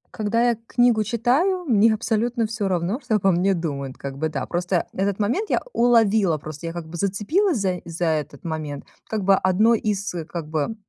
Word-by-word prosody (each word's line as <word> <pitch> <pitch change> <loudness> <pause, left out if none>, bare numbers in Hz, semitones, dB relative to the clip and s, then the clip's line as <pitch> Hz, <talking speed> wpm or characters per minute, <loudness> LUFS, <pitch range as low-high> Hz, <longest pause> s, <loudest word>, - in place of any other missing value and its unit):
Когда 225 +2 +1
я 235 - -3
книгу 240 -3 +3
читаю, 265 - +1
мне 225 -3 +4
абсолютно 225 +1 0
всё 215 -2 -2
равно, 185 +6 -1
что 230 -3 0
обо 195 -2 +3
мне 185 +2 +2
думают, 140 -5 -4
как 135 -1 -6
бы 160 +1 0
да. 140 -4 -3
Просто 175 0 -1
этот 195 0 -1
момент 250 - 0
я - - +2
уловила, 220 -7 +3
просто 155 +2 -8
я 165 - -4
как 170 -2 -6
бы 170 - -8
зацепилась 230 - +1
заи 185 -3 -1
за 170 +1 -3
этот 150 -3 -2
момент, 155 -3 -4 0.2
как 215 -3 -2
бы 195 +1 +5
одно 190 +5 +3
из 205 -3 -1 0.2
как 170 -3 -5
бы 155 +7 -1
195 Hz, 195 wpm, -23 LUFS, 170-230 Hz, 0.2 s, бы